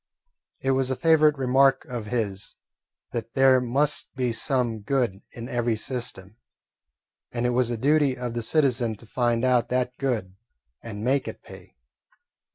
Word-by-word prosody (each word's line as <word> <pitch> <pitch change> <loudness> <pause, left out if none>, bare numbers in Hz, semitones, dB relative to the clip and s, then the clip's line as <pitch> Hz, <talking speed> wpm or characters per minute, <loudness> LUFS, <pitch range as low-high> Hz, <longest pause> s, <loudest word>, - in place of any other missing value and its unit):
It 135 - +1
was 130 -1 +1
a 130 - 0
favourite 155 -2 +4
remark 135 +1 +3
of 120 -6 -6
his 105 -5 -3 0.6
that 115 -1 -5
there 135 -1 +5
must 140 +4 0
be 125 -2 0
some 120 -1 0
good 110 -3 -1
in 120 0 -8
every 120 -2 0
system, 110 -4 -5 0.9
and 120 0 -2
it 125 - +2
was 125 -1 +2
the 120 - -2
duty 140 +1 +2
of 125 -1 -4
the 120 - -2
citizen 120 -4 +1
to 110 - -15
find 120 +1 0
out 125 -2 +2
that 125 0 -1
good 115 -9 -2 0.5
and 105 -2 -7
make 130 +3 +1
it - - -8
pay. - - -14
125 Hz, 160 wpm, -25 LUFS, 115-135 Hz, 0.9 s, there